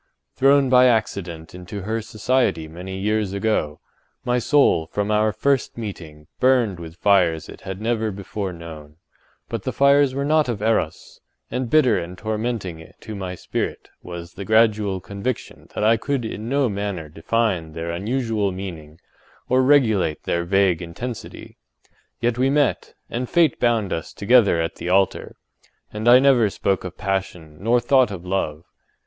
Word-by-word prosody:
Thrown 135 +1 +4
by 125 0 +6
accident 90 -8 -1
into 90 +3 -7
her 110 +3 -2
society 110 -6 0
many 90 +4 -7
years 105 0 -1
ago, 100 -8 -1 0.5
my 125 0 +1
soul 120 - +3
from 105 +4 -2
our 105 0 +2
first 130 +4 0
meeting, 80 -9 -8
burned 125 -8 +3
with 80 -1 -9
fires 90 -5 +2
it - - -12
had 95 0 -6
never 110 0 -1
before 100 0 -5
known; 80 -3 -10 0.5
but - - -4
the - - -3
fires 140 -1 +4
were 140 0 -1
not 155 -2 +2
of 115 -4 -2
Eros, 110 -7 -1 0.3
and 125 -1 -2
bitter 130 -5 +4
and 90 +2 -7
tormenting 105 -6 -4
to 110 - -8
my 95 -3 -5
spirit - - -4
was 85 -1 -8
the 100 - -7
gradual 105 -3 +2
conviction 100 +8 -5
that - - -1
I 115 +2 +4
could 135 +1 -2
in 110 +1 -5
no 140 0 +2
manner 100 -6 -4
define 85 0 -1
their 85 +1 -4
unusual 110 +2 -1
meaning 85 -5 -8 0.5
or 130 +1 +4
regulate 110 - +3
their 85 0 -1
vague 95 -2 +2
intensity. 110 +8 -7 0.6
Yet 120 0 0
we 130 +1 +3
met; 145 -1 0
and 125 +1 -4
fate 170 -3 +3
bound 115 -5 +1
us 80 - -5
together 105 -4 +4
at 80 0 -2
the 90 - -4
altar; 95 +1 +1 0.6
and 105 +2 -3
I 120 +1 +9
never 130 -5 +4
spoke 95 -1 -1
of 90 -1 -7
passion 95 -6 -3
nor 115 +5 +2
thought 130 +1 +3
of 95 -3 -7
love. 85 -5 -2
105 Hz, 160 wpm, -22 LUFS, 90-120 Hz, 0.6 s, I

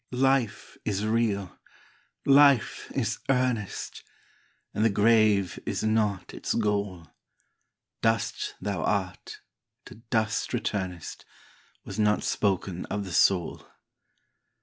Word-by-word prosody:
Life 130 -2 0
is 105 0 -1
real! 110 -4 0 0.7
Life 140 -3 +4
is - - -1
earnest! 125 -6 -1 0.7
And 105 - 0
the 115 - +5
grave 105 -2 +3
is - - -3
not 110 -3 0
its - - -3
goal; 100 -5 -1 1.0
Dust 115 -1 0
thou 100 -5 -3
art, 95 -3 -2 0.4
to 110 - -13
dust 110 -3 0
returnest, 90 -4 -4 0.6
Was - - -6
not 105 0 +2
spoken 95 -3 -1
of 100 -1 -3
the 90 - -7
soul. 90 -4 +2
105 Hz, 105 wpm, -27 LUFS, 100-115 Hz, 1.0 s, the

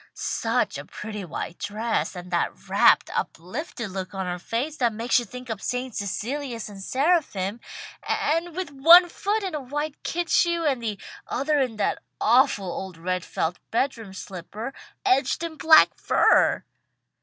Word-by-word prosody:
Such - - -1
a - - -8
pretty 210 -1 -7
white 170 0 -6
dress, 220 0 -2
and 180 0 -8
that 170 - -2
rapt, - - +4
uplifted 215 - -4
look 190 +1 -5
on 190 -1 -2
her 180 0 -3
face 255 - -3
that 240 -3 +1
makes 230 +3 +2
you 240 - -5
think 250 +3 -9
of 220 -4 -5
St. 250 0 -3
Cecilias 235 +4 -3
and 200 -1 -10
seraphim, 255 - 0 0.4
and 330 +2 -1
with 365 -4 -4
one 335 +6 +8
foot 415 +5 -1
in 375 -3 -3
a 300 - -3
white 295 +3 -4
kid 350 0 -2
shoe, 340 -1 +3
and 270 -5 +1
the 215 -3 -3 0.3
other 290 +3 0
in 255 -4 0
that 210 - 0 0.2
awful 245 -5 +4
old 185 0 -5
red 180 +1 -2
felt 165 +2 -2
bedroom 230 -4 -1
slipper, 200 +7 -7 0.3
edged 270 +5 +2
in 330 -1 -4
black 315 0 +6
fur!" - - +3
240 Hz, 160 wpm, -25 LUFS, 195-295 Hz, 0.4 s, one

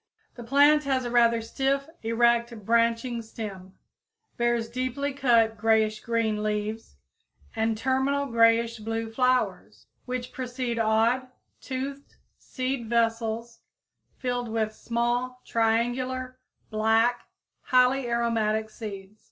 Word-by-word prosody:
The 240 - -9
plant 290 +4 +4
has 265 -2 0
a 240 - -3
rather 235 -1 +4
stiff, 275 +4 -1
erect, 235 -1 +1
branching 230 +1 +1
stem, 195 -4 -8 0.6
bears 235 -1 0
deeply 255 +4 -3
cut 230 -5 +3
grayish 220 -1 +2
green 225 -2 -1
leaves 215 +1 -3 0.6
and 225 0 0
terminal 265 +3 0
grayish 230 -1 +3
blue 225 +1 -3
flowers, 255 +2 0 0.2
which 250 0 -4
precede 250 -2 -3
odd, 225 +4 +2 0.3
toothed, 275 +1 -6 0.2
seed 255 -3 -4
vessels 230 0 -1 0.6
filled 245 -2 -2
with 220 -1 -1
small, 240 +2 -2
triangular, 255 +3 -1 0.3
black, 225 +3 +2 0.3
highly 255 0 +3
aromatic 220 -2 0
seeds. 205 -2 -8
235 Hz, 105 wpm, -26 LUFS, 225-255 Hz, 0.6 s, plant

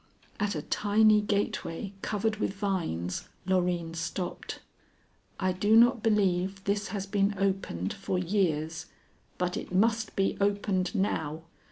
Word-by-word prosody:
At 205 -2 0
a 150 - -3
tiny 210 +1 +4
gateway 200 -2 -2
covered 220 +1 -1
with 205 - -1
vines, 170 - -2 0.2
Loreen 175 -3 0
stopped. 175 +2 -4 0.8
"I 185 - +1
do 205 +4 +3
not 240 +1 +6
believe 195 -3 +1
this 200 +1 0
has 195 0 -3
been 200 0 +1
opened 190 - -1
for 185 - -2
years, 165 -4 0 0.5
but 180 0 -1
it - - -5
must 220 +3 +2
be 195 0 +1
opened 200 -1 +1
now." 160 -5 -1
195 Hz, 130 wpm, -29 LUFS, 180-205 Hz, 0.8 s, not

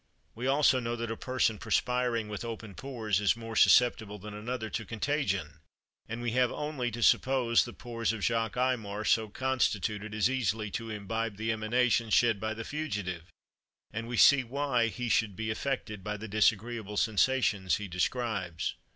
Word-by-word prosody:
We 125 +3 -4
also 135 -1 +4
know 120 -1 -2
that 115 -1 -4
a - - -2
person 120 -4 0
perspiring 125 -3 0
with 105 +1 -5
open 115 -3 -6
pores 110 -6 -2
is 105 +3 +2
more 115 -1 -7
susceptible 110 -4 +4
than 105 +1 -9
another 110 +2 -4
to 110 - -3
contagion; 110 - -2 0.5
and 115 +2 -5
we 120 - -1
have 125 +1 +2
only 150 -5 -3
to 120 +1 -4
suppose 125 0 +3
the 120 - -7
pores 115 -2 -2
of 110 -4 -5
Jacques 115 -1 0
Aymar 110 -5 -1
so 110 -1 +2
constituted 110 -4 -1
as 110 - +3
easily 110 -5 -1
to 115 +2 -4
imbibe 110 0 -3
the 110 +1 -1
emanations 115 0 +1
shed 115 -4 +3
by 110 +1 -3
the 115 - -5
fugitive, 100 - -4 0.6
and 115 +1 -4
we 120 0 -3
see 135 +5 +7
why 125 -1 0
he 120 +2 -4
should 110 -3 +1
be 110 +1 -3
affected 110 -4 -3
by 105 +1 -3
the 110 +2 -7
disagreeable 110 0 0
sensations 110 -4 +2
he 105 - -5
describes. 95 -2 -2
115 Hz, 170 wpm, -30 LUFS, 105-125 Hz, 0.6 s, see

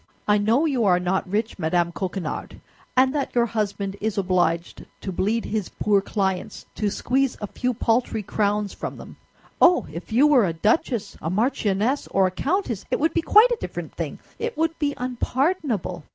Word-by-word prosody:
I 210 0 +4
know 230 +9 +3
you 270 -7 +1
are 180 -2 +4
not 180 +1 -1
rich, 215 +2 -2
Madame 170 +1 +1
Coquenard, 180 -1 -4 0.4
and 260 +1 +5
that 285 -4 -2
your 240 -1 +4
husband 200 -3 -2
is 220 -1 -1
obliged 175 -3 0 0.2
to 190 - -4
bleed 210 +6 0
his 210 -3 -2
poor 205 -2 +1
clients 190 -2 -2
to 210 - -1
squeeze 260 +5 0
a 210 - -3
few 250 +5 -2
paltry 225 -1 0
crowns 205 0 0
from - - -6
them. - - -11 0.4
Oh! 355 0 +6
If 170 +6 -8
you 250 +6 +5
were 265 -9 +5
a 165 - -2
duchess, 215 - 0
a 160 - -2
marchioness, 215 +4 0
or 195 -1 +2
a 185 - 0
countess, 275 - -1
it - - 0
would 320 +2 +1
be 335 - +2
quite 430 +8 +6
a 480 - +1
different - - -6
thing; - - -4 0.2
it 470 +1 -3
would 325 +1 +1
be 290 -2 0
unpardonable." 250 - -1
215 Hz, 180 wpm, -24 LUFS, 190-260 Hz, 0.4 s, Oh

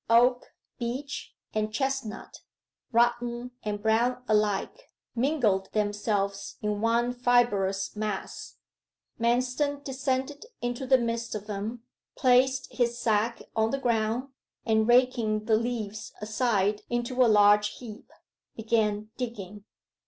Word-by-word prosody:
Oak, 245 +2 +3 0.2
beech, 255 +4 -5 0.2
and 215 0 -1
chestnut, 265 -2 -3 0.5
rotten 240 +1 +1
and 205 -1 -4
brown 240 +3 +2
alike, 215 - 0 0.2
mingled 235 -7 +1
themselves 205 -1 -1
in 210 -1 -1
one 235 +2 +2
fibrous 235 -7 +1
mass. 210 -2 -5 0.6
Manston 255 +5 0
descended 270 - -2
into 245 +2 -3
the 260 0 +6
midst 230 -1 -2
of 210 -1 -5
them, 215 +3 -5 0.3
placed 260 +1 +3
his 240 -1 0
sack 225 0 0
on 220 0 +2
the 275 - -1
ground, 235 0 0 0.4
and 220 -1 +2
raking 240 -4 +3
the 220 -1 +4
leaves 220 -2 -3
aside 210 -2 0
into 240 +2 +1
a 240 - +4
large 210 0 +5
heap, 230 -2 -10 0.5
began 215 -1 0
digging. 210 -5 -6
230 Hz, 115 wpm, -28 LUFS, 210-250 Hz, 0.6 s, the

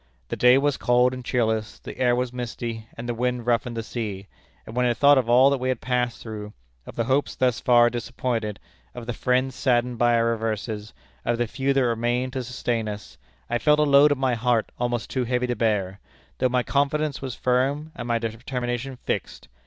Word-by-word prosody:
The - - -2
day 125 +1 +6
was 145 0 +1
cold 125 +1 +3
and 125 0 -6
cheerless, 110 -3 -1
the - - -10
air 125 -1 +3
was 125 0 -2
misty, 115 -2 -5
and 115 +1 -6
the 120 - -1
wind 125 0 -2
roughened 120 0 0
the 115 - -2
sea; 105 -5 -5 0.4
and 110 - -10
when 125 0 +2
I 120 - +1
thought 140 +3 +6
of 120 -2 -2
all 130 +3 +6
that 140 - 0
we 130 +1 -1
had 130 -3 -1
passed 125 -1 -1
through 105 -2 -7 0.3
of - - -9
the 115 - 0
hopes 135 +4 0
thus 125 -3 +1
far 120 -1 +5
disappointed, 120 -3 -3 0.4
of 115 - -7
the 120 - -3
friends 125 +2 0
saddened 120 -2 0
by 120 0 +4
our 115 0 +2
reverses, 110 -1 -3 0.3
of 120 - 0
the 120 - +1
few 135 +4 -1
that 135 -2 +3
remained 120 +2 0
to 130 -2 -2
sustain 120 -2 -2
us 105 0 -8 0.3
I 120 0 -1
felt 150 +3 +4
a 150 - +4
load 145 0 +6
at 145 - +1
my 130 -1 +1
heart 120 -1 +1
almost 120 -2 -1
too 130 -2 -1
heavy 125 +1 0
to 125 -1 -1
bear, 100 -4 0 0.4
though 130 - +2
my 125 0 +1
confidence 145 +1 0
was 130 -3 -5
firm, 135 +5 0
and 120 - -6
my 120 -1 +1
determination 120 +3 -4
fixed. - - -4
120 Hz, 210 wpm, -24 LUFS, 115-130 Hz, 0.4 s, day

